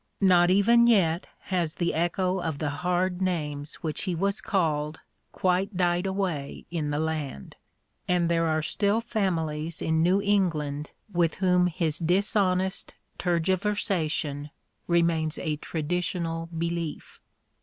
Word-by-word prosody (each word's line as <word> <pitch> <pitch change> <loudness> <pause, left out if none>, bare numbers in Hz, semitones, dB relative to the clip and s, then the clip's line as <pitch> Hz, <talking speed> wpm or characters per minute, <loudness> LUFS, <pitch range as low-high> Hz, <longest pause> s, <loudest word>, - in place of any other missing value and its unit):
Not 180 -3 +5
even 230 +5 +5
yet 180 -7 +3 0.3
has 170 -4 0
the 170 -1 0
echo 180 +3 0
of 160 -4 -2
the 145 -1 -2
hard 180 +3 -1
names 150 -5 -2
which 155 +2 -2
he 180 -3 -1
was 200 +4 0
called 155 -5 0 0.3
quite 185 +2 0
died 175 +1 +1
away 185 -8 -3
in 155 -4 -1
the 145 - -1
land; 155 - -3 0.5
and 175 -1 +2
there 165 -1 +2
are 155 -1 +1
still 205 +6 +1
families 165 -8 -2
in 160 0 +1
New 180 +4 +4
England 160 -8 0 0.2
with 170 -2 +2
whom 180 -1 +3
his 165 -2 -1
dishonest 185 +1 +1 0.2
tergiversation 170 -5 0 0.4
remains 170 -2 +2
a 155 -4 -2
traditional 165 +1 -2
belief. 170 -1 -4
170 Hz, 125 wpm, -27 LUFS, 160-185 Hz, 0.5 s, Not